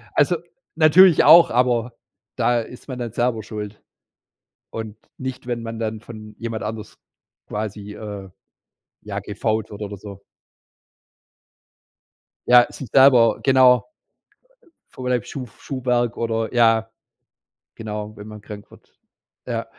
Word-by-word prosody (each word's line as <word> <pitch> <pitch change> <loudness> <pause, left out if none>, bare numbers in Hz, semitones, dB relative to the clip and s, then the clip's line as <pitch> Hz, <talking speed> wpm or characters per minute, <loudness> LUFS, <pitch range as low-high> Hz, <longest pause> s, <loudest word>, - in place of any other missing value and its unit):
Also - - +3 0.4
natürlich 165 +2 +6
auch, 170 +1 +8
aber 120 -1 +1 0.4
da 120 -1 +2
ist 125 +4 -10
man 125 -1 -5
nicht 120 -3 -5
selber 120 -2 0
schuld 105 -1 -8 0.9
und 110 -1 -7 0.2
nicht, 130 -1 -6
wenn 120 -2 -3
man 115 0 -6
dann 110 -1 -3
von 110 -2 -11
jemand 115 -1 -5
anders 105 0 -7 0.5
quasi, 105 -1 -5
äh, 100 -3 -8 0.7
ja, - - -6
gefoult 110 -1 -3
wird 105 0 -10
oder 100 -1 -6
so. 100 0 -11 2.3
Ja, 125 0 +7
sich 135 - -8
selber, 130 -4 +5
genau 130 - +4 1.0
Vogelleib 125 -3 -2
Schuf 130 -4 -9
Schuhwerk 125 -3 -1
oder 115 0 -2
Ja, 115 -2 +3 0.8
genau, 105 -1 -6
wenn 105 - -10
man 105 0 -10
krank 105 0 -11
wird. - - -20 0.5
Ja. - - -3
115 Hz, 120 wpm, -21 LUFS, 105-125 Hz, 2.3 s, auch